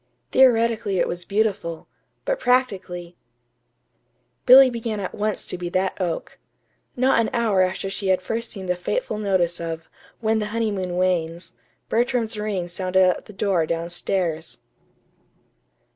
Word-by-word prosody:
Theoretically 230 Hz, -5 st, +3 dB
it -, -, +2 dB
was 175 Hz, 0 st, -4 dB
beautiful; 195 Hz, -6 st, -1 dB, 0.4 s
but -, -, 0 dB
practically 190 Hz, -9 st, 0 dB, 1.3 s
Billy 265 Hz, +1 st, +10 dB
began 230 Hz, -2 st, -3 dB
at 190 Hz, -, -4 dB
once 210 Hz, 0 st, -2 dB
to 180 Hz, -, -4 dB
be 175 Hz, -1 st, -3 dB
that 185 Hz, +2 st, -1 dB
oak. 170 Hz, -3 st, -3 dB, 0.6 s
Not 260 Hz, 0 st, +3 dB
an 230 Hz, -, +1 dB
hour 225 Hz, -5 st, +2 dB
after 185 Hz, +1 st, 0 dB
she 195 Hz, 0 st, -4 dB
had 185 Hz, -1 st, +3 dB
first 225 Hz, +5 st, -4 dB
seen 195 Hz, -3 st, -7 dB
the 180 Hz, 0 st, 0 dB
fateful 350 Hz, -, -2 dB
notice 185 Hz, -4 st, +1 dB
of 165 Hz, -1 st, -5 dB, 0.3 s
"When 220 Hz, -1 st, +1 dB
the 210 Hz, -, -2 dB
Honeymoon 205 Hz, -5 st, -2 dB
Wanes," 175 Hz, -2 st, -1 dB, 0.3 s
Bertram's 235 Hz, -1 st, 0 dB
ring 210 Hz, -4 st, -2 dB
sounded 185 Hz, +1 st, +1 dB
at -, -, -2 dB
the -, -, -11 dB
door 190 Hz, -5 st, +1 dB
down 170 Hz, +1 st, -2 dB
stairs. 170 Hz, -2 st, -2 dB
195 Hz, 145 wpm, -23 LUFS, 175-225 Hz, 1.3 s, Billy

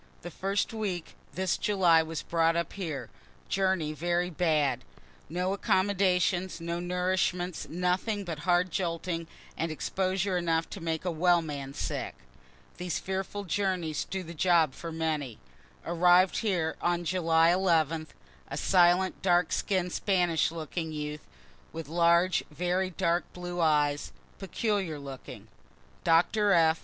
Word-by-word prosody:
The 175 Hz, -, -6 dB
first 195 Hz, +6 st, -1 dB
week 195 Hz, -6 st, -3 dB, 0.2 s
this 185 Hz, -1 st, 0 dB
July 180 Hz, -5 st, +4 dB
was 160 Hz, 0 st, -5 dB
brought 165 Hz, 0 st, +2 dB
up 170 Hz, 0 st, -2 dB
here 155 Hz, -, -5 dB, 0.4 s
journey 190 Hz, -5 st, +1 dB
very 175 Hz, +3 st, -1 dB
bad, 150 Hz, -6 st, +1 dB, 0.5 s
no 180 Hz, +4 st, -1 dB
accommodations, 190 Hz, -3 st, +1 dB
no 170 Hz, +1 st, -3 dB
nourishment, 180 Hz, 0 st, -1 dB
nothing 180 Hz, +5 st, -1 dB
but 165 Hz, -5 st, -5 dB
hard 175 Hz, +2 st, +2 dB
jolting, 170 Hz, -1 st, -2 dB, 0.3 s
and 165 Hz, 0 st, -2 dB
exposure 185 Hz, +4 st, -1 dB
enough 165 Hz, -1 st, 0 dB
to 195 Hz, -, -7 dB
make 165 Hz, +1 st, -2 dB
a 180 Hz, -, 0 dB
well 170 Hz, +1 st, +3 dB
man 140 Hz, -3 st, -6 dB
sick; -, -, -3 dB, 0.6 s
(these 180 Hz, -2 st, -2 dB
fearful 190 Hz, +2 st, -4 dB
journeys 185 Hz, -4 st, -1 dB
do 190 Hz, -1 st, -4 dB
the 170 Hz, 0 st, -8 dB
job 165 Hz, -3 st, +3 dB
for 165 Hz, +3 st, -7 dB
many) 155 Hz, -7 st, -2 dB, 0.5 s
arrived 175 Hz, +2 st, +4 dB
here 180 Hz, -8 st, 0 dB, 0.3 s
July 165 Hz, -1 st, +3 dB
11th 165 Hz, -4 st, +1 dB, 0.4 s
a -, -, -5 dB
silent 180 Hz, 0 st, +3 dB
dark 175 Hz, -2 st, +3 dB
skinn'd 185 Hz, -3 st, 0 dB
Spanish 175 Hz, -5 st, +2 dB
looking 160 Hz, 0 st, -4 dB
youth, 150 Hz, 0 st, -5 dB, 0.4 s
with 165 Hz, -2 st, -7 dB
large 170 Hz, +3 st, +3 dB
very 180 Hz, +4 st, -1 dB
dark 170 Hz, 0 st, 0 dB
blue 175 Hz, 0 st, -5 dB
eyes, 150 Hz, -2 st, +2 dB, 0.3 s
peculiar 195 Hz, -4 st, -1 dB
looking. 130 Hz, -5 st, -9 dB, 0.6 s
Doctor 195 Hz, +5 st, +3 dB
F. 160 Hz, -1 st, +4 dB
175 Hz, 130 wpm, -29 LUFS, 160-185 Hz, 0.6 s, July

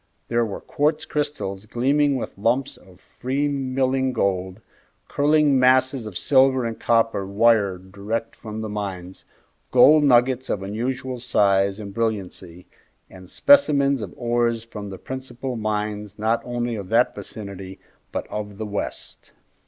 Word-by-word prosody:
There 120 Hz, 0 st, +2 dB
were 105 Hz, -4 st, -5 dB
quartz 150 Hz, +2 st, 0 dB
crystals 140 Hz, -10 st, -3 dB
gleaming 140 Hz, +5 st, +2 dB
with 130 Hz, -, -5 dB
lumps 120 Hz, +7 st, 0 dB
of 95 Hz, -2 st, -19 dB
free 135 Hz, +7 st, -3 dB
milling 130 Hz, -1 st, 0 dB
gold, 95 Hz, -3 st, -1 dB, 0.5 s
curling 145 Hz, -1 st, +3 dB
masses 130 Hz, -1 st, +3 dB
of 95 Hz, -5 st, -5 dB
silver 130 Hz, -2 st, +3 dB
and 115 Hz, -1 st, -4 dB
copper 115 Hz, -3 st, +1 dB
wire 100 Hz, -1 st, +2 dB
direct 100 Hz, +5 st, -5 dB
from 110 Hz, 0 st, -7 dB
the 110 Hz, -, -4 dB
mines, 95 Hz, -3 st, -6 dB, 0.4 s
gold 150 Hz, +1 st, +6 dB
nuggets 130 Hz, -1 st, +3 dB
of 95 Hz, -, -2 dB
unusual 125 Hz, +5 st, -3 dB
size 100 Hz, -4 st, +2 dB
and 100 Hz, -2 st, -8 dB
brilliancy, 95 Hz, -5 st, -4 dB, 0.5 s
and 95 Hz, -1 st, -13 dB
specimens 140 Hz, -, +4 dB
of 100 Hz, -4 st, -7 dB
ores 120 Hz, -1 st, 0 dB
from 105 Hz, -3 st, -8 dB
the 95 Hz, -, -7 dB
principal 130 Hz, +1 st, -6 dB
mines 105 Hz, -1 st, -3 dB
not 110 Hz, +2 st, 0 dB
only 120 Hz, -1 st, -3 dB
of 100 Hz, -4 st, -6 dB
that -, -, +3 dB
vicinity, 95 Hz, -3 st, -8 dB, 0.3 s
but -, -, -3 dB
of 105 Hz, -1 st, -6 dB
the 110 Hz, -, -4 dB
West. 105 Hz, -1 st, -6 dB
115 Hz, 140 wpm, -23 LUFS, 100-130 Hz, 0.5 s, gold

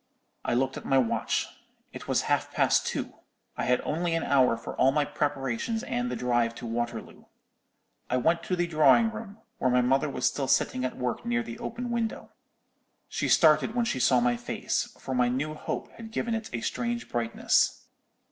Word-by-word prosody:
"I -, -, 0 dB
looked 130 Hz, +2 st, 0 dB
at -, -, -7 dB
my 135 Hz, -, +2 dB
watch. 125 Hz, -4 st, +1 dB, 0.5 s
It -, -, -9 dB
was -, -, +1 dB
half -, -, 0 dB
past -, -, +2 dB
two. -, -, -4 dB, 0.4 s
I -, -, -2 dB
had 125 Hz, 0 st, +2 dB
only 165 Hz, +2 st, -1 dB
an 165 Hz, -, 0 dB
hour 130 Hz, -4 st, +3 dB
for 115 Hz, -, -7 dB
all 135 Hz, -, +5 dB
my 150 Hz, +1 st, +1 dB
preparations 145 Hz, -, -2 dB
and 245 Hz, 0 st, -2 dB
the -, -, -3 dB
drive 120 Hz, -2 st, +1 dB
to -, -, -8 dB
Waterloo. 120 Hz, 0 st, -4 dB, 0.8 s
I 125 Hz, -, +1 dB
went 165 Hz, +7 st, +2 dB
to 185 Hz, -, 0 dB
the 175 Hz, 0 st, +1 dB
drawing 155 Hz, -, +4 dB
room, 220 Hz, -2 st, -8 dB, 0.2 s
where 130 Hz, -, +2 dB
my 125 Hz, 0 st, +4 dB
mother 135 Hz, +4 st, +2 dB
was -, -, -2 dB
still 135 Hz, -2 st, 0 dB
sitting 130 Hz, 0 st, +1 dB
at 130 Hz, -, -3 dB
work 125 Hz, -2 st, -2 dB
near 120 Hz, 0 st, 0 dB
the 115 Hz, 0 st, -8 dB
open 245 Hz, 0 st, -4 dB
window. 230 Hz, -2 st, -3 dB, 0.8 s
She -, -, -2 dB
started 160 Hz, +7 st, +4 dB
when 240 Hz, -1 st, +2 dB
she 130 Hz, -, -1 dB
saw 125 Hz, 0 st, +4 dB
my 120 Hz, 0 st, +2 dB
face, 120 Hz, -, -2 dB
for 130 Hz, -, -5 dB
my 125 Hz, -1 st, +3 dB
new 140 Hz, +5 st, -2 dB
hope 155 Hz, -, -5 dB
had 230 Hz, -1 st, -10 dB
given 230 Hz, +1 st, -2 dB
it 225 Hz, -1 st, -3 dB
a 120 Hz, -, -3 dB
strange 235 Hz, -, -2 dB
brightness. 115 Hz, -1 st, +1 dB
135 Hz, 195 wpm, -28 LUFS, 125-180 Hz, 0.8 s, all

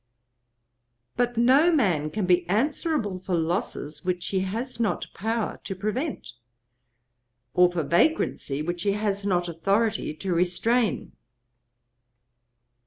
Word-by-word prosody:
But 245 Hz, -1 st, 0 dB
no 265 Hz, +8 st, +5 dB
man 180 Hz, -, +2 dB
can 205 Hz, +3 st, -2 dB
be 180 Hz, -1 st, +2 dB
answerable 240 Hz, -, 0 dB
for 185 Hz, 0 st, -2 dB
losses 160 Hz, -3 st, -2 dB
which 180 Hz, -1 st, -2 dB
he 190 Hz, -, 0 dB
has 225 Hz, +7 st, -4 dB
not 225 Hz, -3 st, 0 dB
power 225 Hz, +1 st, -2 dB
to 195 Hz, -, -5 dB
prevent, 225 Hz, -, -3 dB, 1.2 s
or 180 Hz, 0 st, +5 dB
for 170 Hz, -2 st, -1 dB
vagrancy 160 Hz, -, +1 dB
which 175 Hz, +2 st, -3 dB
he 200 Hz, +2 st, +1 dB
has 205 Hz, -1 st, -1 dB
not 175 Hz, -2 st, +1 dB
authority 195 Hz, +1 st, 0 dB
to 185 Hz, +3 st, -3 dB
restrain. 180 Hz, -, +1 dB
195 Hz, 115 wpm, -26 LUFS, 175-230 Hz, 1.2 s, no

